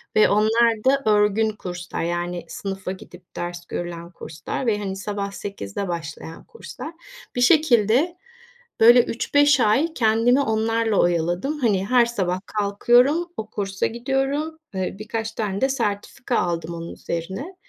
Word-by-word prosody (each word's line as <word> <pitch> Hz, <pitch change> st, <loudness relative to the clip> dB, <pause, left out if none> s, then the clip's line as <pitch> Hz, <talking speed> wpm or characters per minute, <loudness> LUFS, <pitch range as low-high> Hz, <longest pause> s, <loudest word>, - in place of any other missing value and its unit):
ve 215 Hz, -, +5 dB
onlar 220 Hz, +1 st, +3 dB
da 275 Hz, +1 st, +3 dB
örgün 210 Hz, +1 st, +3 dB
kurslar. 180 Hz, -5 st, -6 dB
Yani, 175 Hz, 0 st, -3 dB
sınıfa 195 Hz, +1 st, -5 dB
gidip 180 Hz, -1 st, -13 dB
ders 175 Hz, 0 st, -5 dB
görülen 170 Hz, 0 st, -6 dB
kurslar 160 Hz, -, -6 dB
ve 210 Hz, -3 st, +1 dB
hani 195 Hz, -2 st, -4 dB
sabah 200 Hz, 0 st, -4 dB
8'de 195 Hz, -, -5 dB
başlayan 165 Hz, -1 st, -6 dB
kurslar. 455 Hz, -8 st, -9 dB, 0.4 s
Bir 245 Hz, -, 0 dB
şekilde 280 Hz, -, +4 dB, 0.6 s
böyle 240 Hz, +2 st, +8 dB
3-5 285 Hz, +4 st, +3 dB
ay 290 Hz, +10 st, +2 dB
kendimi 230 Hz, +3 st, +3 dB
onlarla 225 Hz, -2 st, 0 dB
oyaladım. 175 Hz, -, 0 dB
Hani, 200 Hz, -6 st, +1 dB
her 245 Hz, -1 st, +5 dB
sabah 185 Hz, -6 st, -1 dB
kalkıyorum, 245 Hz, -, +2 dB
o 215 Hz, 0 st, -5 dB
kursa 195 Hz, -1 st, -2 dB
gidiyorum, 270 Hz, +6 st, -2 dB, 0.2 s
eee, 190 Hz, 0 st, -2 dB
birkaç 220 Hz, +1 st, -4 dB
tane 205 Hz, -3 st, -3 dB
de 265 Hz, -, +3 dB
sertifika 235 Hz, 0 st, -2 dB
aldım 170 Hz, -1 st, -2 dB
onun 165 Hz, 0 st, -7 dB
üzerine. 190 Hz, -, -5 dB
215 Hz, 135 wpm, -23 LUFS, 185-245 Hz, 0.6 s, böyle